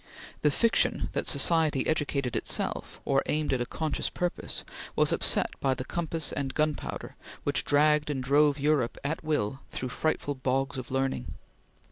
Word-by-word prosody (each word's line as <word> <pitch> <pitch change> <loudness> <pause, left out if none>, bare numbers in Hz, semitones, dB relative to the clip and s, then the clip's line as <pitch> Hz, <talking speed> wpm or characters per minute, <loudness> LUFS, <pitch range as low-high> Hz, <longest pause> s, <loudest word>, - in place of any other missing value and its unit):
The 150 - +4
fiction 230 +10 +2
that - - -2
society 160 -5 +3
educated 140 -5 0
itself, - - -2
or 135 -1 +3
aimed 150 -2 0
at 125 - 0
a 120 - -2
conscious 155 -2 -2
purpose, 175 -1 -3 0.3
was - - +3
upset - - +1
by 135 -1 +1
the 130 - -5
compass 165 -2 -2
and 135 -2 -3
gunpowder 155 -1 -2 0.3
which - - +2
dragged 150 +1 +4
and 135 -3 -2
drove 145 +2 +4
Europe 145 -4 +1
at 150 +4 -2
will 135 -5 -1
through 130 - -4
frightful 145 +1 -1
bogs 135 +1 -1
of 125 - -7
learning. 135 - -2
145 Hz, 155 wpm, -28 LUFS, 130-155 Hz, 0.3 s, The